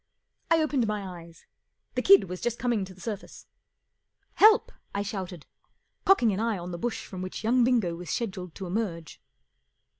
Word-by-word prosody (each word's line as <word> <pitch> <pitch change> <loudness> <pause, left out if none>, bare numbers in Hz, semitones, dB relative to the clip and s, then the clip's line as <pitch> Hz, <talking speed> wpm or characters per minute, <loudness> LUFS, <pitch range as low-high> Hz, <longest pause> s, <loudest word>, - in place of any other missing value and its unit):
I 330 0 +5
opened 275 -7 +1
my 195 -5 -4
eyes. 165 0 -16 0.5
The - - 0
kid 395 0 +7
was 180 +1 -6
just 240 -1 -1
coming 235 -5 0
to 190 - -11
the - - -18
surface. 210 -2 -7 0.9
44 425 - +8
Help! 440 +2 0
" - - -19
I 200 - 0
shouted, 185 -5 -6 0.6
cocking 245 - +5
an 190 - -2
eye 225 -2 0
on 175 0 -6
the 170 - -5
bush 240 +3 -3
from 185 -2 -7
which 185 +3 -6
young 240 +3 +3
Bingo 230 -9 +2
was 175 0 -8
scheduled 190 -7 -4
to 190 - -6
emerge. 175 -4 -4
200 Hz, 185 wpm, -27 LUFS, 180-235 Hz, 0.9 s, 44